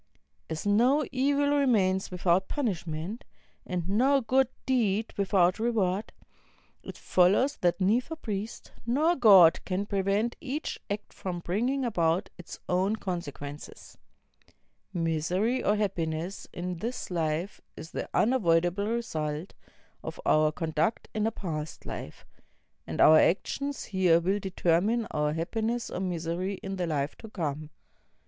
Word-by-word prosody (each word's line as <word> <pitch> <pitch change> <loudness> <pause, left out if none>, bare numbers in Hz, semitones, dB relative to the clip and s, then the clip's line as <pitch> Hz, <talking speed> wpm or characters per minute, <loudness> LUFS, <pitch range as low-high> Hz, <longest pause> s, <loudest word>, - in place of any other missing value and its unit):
As 160 +3 -4
no 245 +9 +3
e\al 285 +2 +2
remains 200 -9 +2
without 180 +1 +1
punishment, 190 - -3 0.4
and 180 -2 -3
no 260 +8 +3
good 260 +2 +2 0.2
deed 225 -4 +1
without 190 -1 +2
reward, 215 -3 0 0.7
it - - -9
follows 200 +10 +3
that 175 +1 +1
neither 235 - +1
priest 215 -6 -5 0.2
nor 305 +8 +3
God 195 - +7
can 190 +2 -2
prevent 200 +3 0
each 290 +3 -4
act 205 +1 -5
from 180 -2 -5
bringing 245 +10 0
about 175 -4 0
its 180 - -10
own 190 +4 +1
consequences. 150 -7 -7 1.0
IMisery 175 +9 0
or 210 - +3
happiness 175 -3 -2
in 180 0 -4
this 230 +2 -5
life 165 +2 -2 0.2
is 160 - -9
the - - -4
unavoidable 180 -4 +2
result 160 -8 -3 0.5
of - - -7
our 155 0 +4
conduct 160 +5 -1
in 215 0 0
a - - 0
past 160 -7 -5
Hf - - -8
e; - - -31 0.5
and - - -5
our 155 0 +8
actions 280 +10 0
here 185 -4 +3
will 190 +4 0
determine 190 +4 +1
our 150 0 0
happiness 225 +8 -2
or - - -3
miser\ 170 -2 -2
in 195 0 -4
the 180 - -1
Hfe 145 -2 -1
to 220 - -11
come. 155 -6 -4
190 Hz, 130 wpm, -28 LUFS, 170-230 Hz, 1.0 s, our